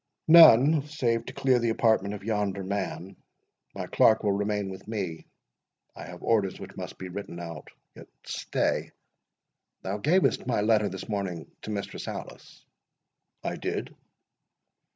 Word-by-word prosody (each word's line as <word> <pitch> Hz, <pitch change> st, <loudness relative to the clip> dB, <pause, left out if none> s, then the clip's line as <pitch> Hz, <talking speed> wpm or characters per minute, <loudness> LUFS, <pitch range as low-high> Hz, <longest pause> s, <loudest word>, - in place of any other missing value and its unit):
"None, 155 Hz, -2 st, +8 dB
save 120 Hz, -7 st, -1 dB
to -, -, -7 dB
clear 130 Hz, -2 st, +2 dB
the 120 Hz, -1 st, 0 dB
apartment 110 Hz, -3 st, +2 dB
of 100 Hz, -, -10 dB
yonder 100 Hz, -2 st, -1 dB
man. 95 Hz, -2 st, -4 dB, 0.6 s
My -, -, -4 dB
clerk 110 Hz, 0 st, +4 dB
will 105 Hz, -, +2 dB
remain 100 Hz, 0 st, -1 dB
with 95 Hz, +1 st, -10 dB
me—I 90 Hz, -, -9 dB
have 90 Hz, +2 st, -11 dB
orders 105 Hz, -5 st, +1 dB
which -, -, -10 dB
must -, -, -7 dB
be 95 Hz, -, -7 dB
written 90 Hz, -2 st, -7 dB
out.—Yet 85 Hz, -3 st, -11 dB, 0.2 s
stay—Thou 95 Hz, +2 st, -5 dB
gavest 165 Hz, -, +2 dB
my 120 Hz, -4 st, +1 dB
letter 105 Hz, -1 st, +3 dB
this 95 Hz, 0 st, -7 dB
morning 95 Hz, -6 st, -4 dB
to -, -, -8 dB
Mistress 100 Hz, -2 st, -5 dB
Alice?" -, -, -9 dB, 0.8 s
"I -, -, -3 dB
did." -, -, -4 dB
105 Hz, 130 wpm, -27 LUFS, 95-115 Hz, 0.8 s, None